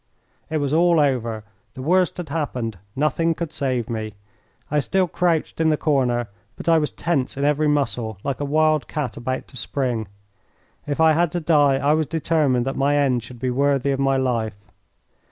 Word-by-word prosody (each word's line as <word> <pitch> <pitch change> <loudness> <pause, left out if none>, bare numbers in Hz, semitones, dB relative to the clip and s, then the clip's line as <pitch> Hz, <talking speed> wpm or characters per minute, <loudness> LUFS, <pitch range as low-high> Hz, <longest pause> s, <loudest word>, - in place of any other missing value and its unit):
It 160 - -1
was 145 -1 -1
all 170 0 +4
over. 120 -6 0 0.3
The 130 - -7
worst 180 +5 +2
had 175 -4 -6
happened. 125 - -3 0.2
Nothing 155 +4 +1
could 170 -2 -5
save 130 -5 -1
me. 110 -2 -4 0.6
I 150 - +3
still 185 +6 +1
crouched 165 -2 0
in 160 - +3
the 155 - +2
corner, 125 -6 +1 0.3
but - - -10
I 165 -1 +5
was 150 - -1
tense 140 -7 -2
in 140 - 0
every 150 +1 +2
muscle, 125 -7 0
like 140 - -2
a - - -2
wild 155 -1 +2
cat 150 -4 -3
about 130 +2 -4
to 130 - -11
spring. 120 -2 -2 0.8
If 145 +1 -2
I 160 -1 +6
had 170 0 +2
to 175 - 0
die 150 -4 +4
I 140 +2 +2
was 155 -1 +1
determined 150 -6 +1
that 135 - -2
my 140 +2 +2
end 130 -4 +2
should 120 +2 -12
be 130 0 -1
worthy 140 +1 +1
of 135 - -1
my 135 0 +2
life. 115 -5 -1
140 Hz, 190 wpm, -22 LUFS, 125-155 Hz, 0.8 s, I